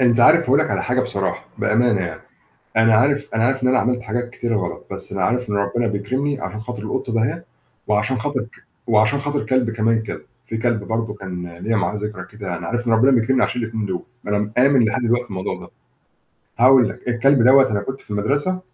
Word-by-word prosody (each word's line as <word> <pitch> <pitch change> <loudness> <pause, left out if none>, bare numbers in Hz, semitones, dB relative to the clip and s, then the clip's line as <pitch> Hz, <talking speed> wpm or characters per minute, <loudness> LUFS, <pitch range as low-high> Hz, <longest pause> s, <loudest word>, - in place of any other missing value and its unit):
أنت 120 -1 +4
عارف - - +7
هاقول - - +2
لك - - +1
على - - 0
حاجة - - +1
بصراحة، - - -2
بأمانة 115 -2 +2
يعني. 85 -2 -5 0.6
أنا 110 0 +5
عارف 140 +5 +2
أنا 115 - +2
عارف 135 +2 +1
إن 125 - +3
أنا 130 0 +3
عملت 125 +1 0
حاجات 120 +2 -3
كتيرة 120 -2 -2
غلط، 90 -4 -4
بس - - -8
أنا 100 -1 -2
عارف 125 +4 0
إن - - -1
ربنا 100 +4 0
بيكرمني 130 +7 -2
عشان 105 0 -5
خاطر 120 -1 -6
القطة 120 +3 -3
دهيّة، 115 -1 0 0.4
وعشان 105 +4 0
خاطر 140 +2 -1
ك 115 - -11 0.2
وعشان 110 +4 +3
خاطر 145 0 -2
كلب 130 -3 +1
كمان 110 0 +1
كده، 110 - -7 0.3
في 115 - -3
كلب 115 -2 0
برضه 110 0 -2
كان 90 -4 -6
ليّا 115 +5 -1
معاه 100 0 0
ذكرى 105 -3 -5
كده، 95 -5 -5
أنا 85 - -7
عارف 120 +3 -2
إن 115 - +2
ربنا 120 +5 +5
بيكرمني 125 +1 +2
عشان 125 - -2
ال2 110 -2 -3
دول، 95 -2 -3 0.3
أنا 105 0 +1
مآمن 125 +5 +3
لحد 115 +4 0
دلوقتي 120 +1 +1
في 120 - -20
الموضوع 95 -1 -4
ده. - - -11 0.9
هاقول 125 -2 +6
لك، 125 +4 -9
الكلب 125 +2 +3
دوّة 130 -1 +6
أنا 100 -1 -1
كنت 130 +6 -6
في - - -20
المدرسة 145 - -1
115 Hz, 220 wpm, -20 LUFS, 105-125 Hz, 0.9 s, عارف